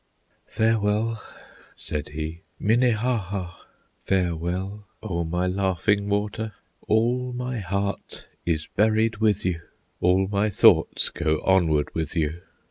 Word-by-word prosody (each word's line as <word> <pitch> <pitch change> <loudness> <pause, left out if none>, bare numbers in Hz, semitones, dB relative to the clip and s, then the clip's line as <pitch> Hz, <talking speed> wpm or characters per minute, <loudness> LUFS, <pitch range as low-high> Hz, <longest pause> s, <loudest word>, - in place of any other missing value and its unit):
"Farewell!" 110 0 +1 0.5
said 75 -1 -5
he, 80 +2 -5 0.2
"Minnehaha! 110 -5 +1 0.5
Farewell, 95 +3 -2 0.2
O 85 -5 -2
my 90 +2 -1
Laughing 100 +2 +1
Water! 105 +1 -1 0.3
All 125 +3 +1
my 125 -1 -3
heart 100 +1 -3 0.2
is 80 -2 0
buried 110 +2 +3
with 105 -3 +1
you, 85 -3 -1 0.4
All 95 +2 +3
my 100 +2 +1
thoughts 100 - +4
go 80 -2 0
onward 80 -6 +3
with 80 +1 -3
you! 80 +1 -1
100 Hz, 110 wpm, -25 LUFS, 85-110 Hz, 0.5 s, thoughts